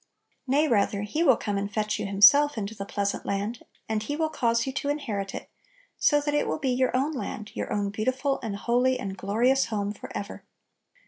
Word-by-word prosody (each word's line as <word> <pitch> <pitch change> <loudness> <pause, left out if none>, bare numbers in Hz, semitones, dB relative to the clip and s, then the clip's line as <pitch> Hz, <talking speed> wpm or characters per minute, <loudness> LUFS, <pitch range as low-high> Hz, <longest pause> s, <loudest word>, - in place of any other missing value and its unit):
Nay, 290 +4 +3
rather, 205 -4 +1
He 255 +10 -2
will 270 -8 +5
come 205 -2 -2
and 200 +1 -4
fetch 210 0 -1
you - - -2
Himself 225 +9 +6
into 210 0 -3
the 200 -2 -7
"pleasant 200 0 -2
land," 205 +4 -3 0.3
and 220 -1 -1
He 290 +7 -3
will 315 0 0
"cause 230 -5 +1
you 265 - -4
to 285 +1 -2
inherit" 215 -10 -3
it, - - -7 0.5
so 295 - +4
that 290 0 -2
it 295 - +1
will - - -1
be 275 -4 -1
your 255 0 +1
own 280 +4 0
land, 230 -7 -5
your - - -4
own 205 -1 -1
beautiful 260 +6 -1
and 220 -4 -4
holy 250 +4 +1
and 195 -1 -4
glorious 235 +8 +2
home 205 -2 -2
forever. 200 0 -7
230 Hz, 205 wpm, -26 LUFS, 200-270 Hz, 0.5 s, Himself